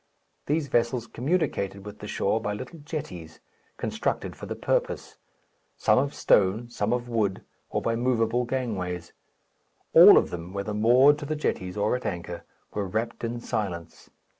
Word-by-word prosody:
These 150 0 +1
vessels 120 -1 +1
communicated 120 - -1
with 105 0 -9
the 105 - -7
shore 110 +2 0
by 105 -1 -2
little 130 +9 -7
jetties, 95 - -7 0.4
constructed - - -2
for - - -9
the - - -4
purpose, - - -1 0.6
some - - +4
of 140 +2 -1
stone, 105 +5 +2
some 105 -2 -1
of 120 0 -1
wood, 110 -5 -1 0.3
or - - -2
by 115 - +1
movable 120 0 +1
gangways. 95 -9 -3 0.8
All - - +10
of - - +2
them, 85 +1 -6
whether 100 +1 -3
moored 125 +7 +5
to 145 - -6
the 155 - -1
jetties 95 -10 -2
or 105 +3 +2
at 125 - -3
anchor, 85 -1 -5 0.3
were 100 -2 -2
wrapped 110 +6 -3
in 120 +1 -2
silence. 95 -9 -4
115 Hz, 160 wpm, -26 LUFS, 100-125 Hz, 0.8 s, All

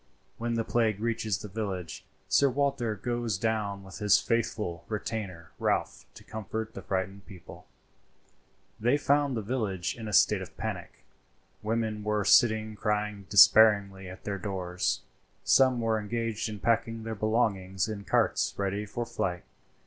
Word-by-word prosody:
When 115 0 -1
the 115 - 0
plague 110 -3 +1
reaches 110 -3 -1
the 105 - -8
village, 95 -5 -5 0.2
Sir 140 - +4
Walter 130 -4 0
goes 120 -1 -2
down 105 -2 -1
with 95 +2 -10
his 105 -1 +5
faithful 105 -7 -2
retainer 105 -6 -5
Ralph - - -1
to - - -13
comfort 110 +1 -5
the - - -7
frightened 95 +1 -3
people.] 90 -5 -13 1.1
They 120 +6 +3
found 145 -2 +2
the 110 - -3
village 100 -6 -2
in 115 -2 -7
a - - -4
state - - +4
of - - -10
panic. - - -6 0.6
Women 110 -1 -2
were 105 -1 0
sitting 110 -2 +4
crying 105 -1 -2
despairingly 100 -2 +6
at 95 - -11
their 100 -1 -3
doors. 90 -2 -2 0.4
Some 130 -2 +4
were 115 -1 +1
engaged 115 +1 -3
in 105 -2 -7
packing 115 -1 0
their 110 0 -4
belongings 105 -3 0
in 105 -2 -5
carts - - +1
ready 100 +1 -2
for 120 +4 -4
flight. 90 -5 -3
105 Hz, 150 wpm, -29 LUFS, 100-115 Hz, 1.1 s, despairingly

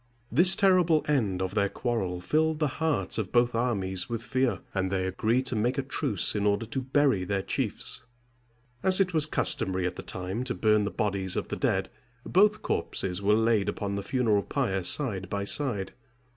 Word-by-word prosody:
This 175 +8 +5
terrible 180 -5 +3
end 105 -11 0
of 95 +1 -4
their 100 -1 +1
quarrel 95 -8 -2
filled 160 - +1
the 150 -1 +1
hearts 160 -7 0
of 105 -3 -4
both 120 0 +3
armies 100 -6 0
with 115 -1 -4
fear, 130 -7 -1
and 95 -1 -1
they 95 -1 0
agreed 110 +7 0
to 130 - -1
make 120 +4 0
a 135 - 0
truce 105 -6 -1
in 105 - -1
order 100 +2 +1
to 130 +4 -3
bury 130 -6 +1
their 95 +1 -2
chiefs. 115 - -2 0.7
As 190 0 +5
it 185 -2 +1
was 155 -2 +4
customary 95 -12 +2
at 90 - -3
that - - -9
time 95 +6 -4
to 125 - -3
burn 105 -1 +2
the - - -1
bodies 100 -5 -1
of - - -3
the - - -3
dead, - - 0 0.4
both 210 +3 +3
corpses 90 0 -2
were 105 +1 +3
laid 110 -2 +2
upon 100 -1 -3
the 100 - -2
funeral 110 -3 +1
pyre 95 -1 -2
side 95 -1 -1
by 100 0 -2
side. 100 -4 -1
110 Hz, 190 wpm, -27 LUFS, 95-135 Hz, 0.7 s, This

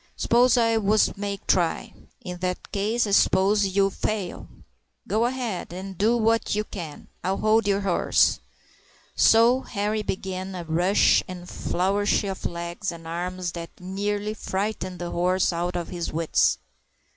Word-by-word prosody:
"S'pose 245 +2 +4
I 230 -1 +3
wos 215 0 +2
make 200 0 -5
try?" 175 -3 +1 0.3
"In 180 -1 -7
that 180 0 -4
case 215 +4 0
I 205 - -3
s'pose 200 +1 +3
ye 195 +1 +1
would 195 - 0
fail. 205 -5 -3
But - - -21 0.5
go 220 +2 +3
ahead, 240 -9 -4
an' 190 +2 -6
do 220 +6 +2
what 225 -1 +1
ye 210 - 0
can. 170 -8 -8 0.2
I'll 190 +2 0
hold 215 0 +2
yer 200 0 +2
horse." 195 -3 +2 0.8
So 235 +3 +5
Henri 210 -1 -2
began 190 -1 -4
by 180 - -5
a - - -7
rush 175 +5 +3
and 180 -2 -8
a - - -12
flourish 195 +4 0
of 195 -2 -3
legs 170 +3 -4
and 165 -1 -11
arms 180 +1 -3
that 170 -1 -7
nearly 205 +3 -2
frightened 195 -2 -3
the 175 0 -5
horse 180 +1 +1
out 175 +1 -2
of 175 -1 -3
his 175 -2 -4
wits. 165 0 +2
195 Hz, 165 wpm, -25 LUFS, 180-215 Hz, 0.8 s, So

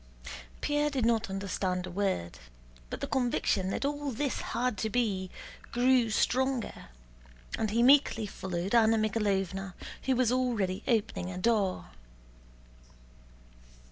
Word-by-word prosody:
Pierre 295 0 +1
did 265 -5 -1
not 230 -3 +2
understand 190 -1 -2
a 180 - -7
word, 185 - -2 0.5
but - - -6
the - - 0
conviction 235 -7 0
that 235 - -2
all 290 0 -2
this 270 +2 -2
had 250 -1 -1
to 220 - -1
be 205 -6 0 0.4
grew 245 -1 +3
stronger, 260 +3 0 0.7
and 220 - -1
he 230 +3 +2
meekly 260 -4 +5
followed 190 -1 -4
Anna 225 -1 +5
Mikháylovna 195 -3 -1 0.3
who 265 - +2
was 245 -2 +2
already 230 -8 0
opening 210 -5 0
a 185 - -6
door. 200 -2 +1
220 Hz, 125 wpm, -30 LUFS, 195-250 Hz, 0.7 s, meekly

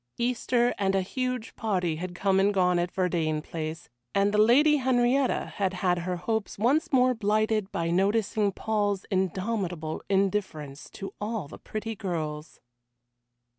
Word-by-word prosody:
Easter 245 0 +1
and 195 -1 +1
a 190 - +2
huge 255 +2 -3
party 180 -7 -1
had 180 +1 -5
come 190 +1 +2
and 200 +1 +2
gone 180 -2 +3
at 175 +1 -1
Verdayne 170 -5 0
Place, 160 +1 -6 0.3
and 200 +1 +3
the 210 - +3
Lady 285 +8 +6
Henrietta 255 0 +1
had 195 -2 0
had 180 -1 +1
her 180 +1 -2
hopes 215 +4 -2
once 285 - +2
more 255 -1 +4
blighted 215 -2 0
by 170 0 -1
noticing 200 +2 +2
Paul's 205 -1 -1
indomitable 185 -3 -2
indifference 190 -8 -1
to 195 - -7
all 210 -5 -3
the - - -11
pretty 215 +1 -5
girls. 155 -6 -4
195 Hz, 145 wpm, -27 LUFS, 180-225 Hz, 0.3 s, Lady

